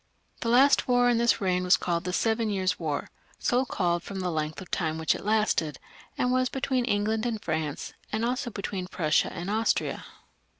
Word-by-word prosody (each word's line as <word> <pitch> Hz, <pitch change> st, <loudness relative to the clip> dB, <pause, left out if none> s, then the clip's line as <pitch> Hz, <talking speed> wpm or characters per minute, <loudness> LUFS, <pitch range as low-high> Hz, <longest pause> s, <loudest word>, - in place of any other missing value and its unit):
The 230 Hz, -, -2 dB
last 265 Hz, +4 st, +5 dB
war 245 Hz, -1 st, +4 dB
in 235 Hz, -1 st, +3 dB
this 235 Hz, 0 st, +3 dB
reign 185 Hz, -3 st, +1 dB
was 180 Hz, -, +5 dB
called 170 Hz, -1 st, -2 dB
The 180 Hz, -, -1 dB
Seven 225 Hz, +3 st, +1 dB
Years' 185 Hz, -4 st, 0 dB
War, 155 Hz, -4 st, -2 dB, 0.3 s
so 250 Hz, +2 st, +1 dB
called 175 Hz, -7 st, 0 dB
from 195 Hz, +2 st, -6 dB
the 180 Hz, -1 st, -1 dB
length 155 Hz, -1 st, -2 dB
of 185 Hz, -, -11 dB
time 160 Hz, -4 st, -1 dB
for 160 Hz, -, -5 dB
which 160 Hz, -, +3 dB
it -, -, -7 dB
lasted, 210 Hz, -9 st, +1 dB, 0.4 s
and 250 Hz, -, +1 dB
was 255 Hz, 0 st, +2 dB
between 260 Hz, -1 st, -1 dB
England 215 Hz, 0 st, 0 dB
and 235 Hz, -3 st, -1 dB
France, 155 Hz, -5 st, -3 dB, 0.2 s
and 220 Hz, +2 st, 0 dB
also 250 Hz, +1 st, -1 dB
between 195 Hz, -3 st, -4 dB
Prussia 155 Hz, -4 st, +1 dB
and 175 Hz, +2 st, -6 dB
Austria. 220 Hz, +2 st, 0 dB
205 Hz, 200 wpm, -27 LUFS, 175-235 Hz, 0.4 s, last